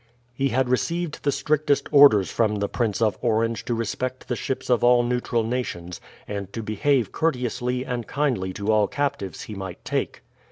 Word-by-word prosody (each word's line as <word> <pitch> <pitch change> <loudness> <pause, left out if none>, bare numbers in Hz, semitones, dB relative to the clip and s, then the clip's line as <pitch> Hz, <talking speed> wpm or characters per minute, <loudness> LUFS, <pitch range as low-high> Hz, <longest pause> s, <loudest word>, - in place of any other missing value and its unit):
He 135 +2 0
had 130 +2 +1
received 165 +6 -1
the 145 - +1
strictest 150 -1 +1
orders 140 -10 +7
from 110 -2 +1
the 100 0 -1
Prince 115 -2 -1
of 105 -4 +1
Orange 115 -1 0
to 120 - -1
respect 125 +3 -3
the 125 - 0
ships 130 - -4
of 125 -2 +2
all 120 0 +5
neutral 120 -1 0
nations, 110 -8 -4 0.3
and 100 -2 -5
to 115 - -4
behave 110 +2 +1
courteously 125 -4 -1
and 120 -4 -4
kindly 130 -10 -1
to 100 +3 -1
all 105 -2 +3
captives 140 -9 -3
he 110 - -8
might 95 -3 -7
take. - - -2
120 Hz, 175 wpm, -24 LUFS, 105-130 Hz, 0.3 s, orders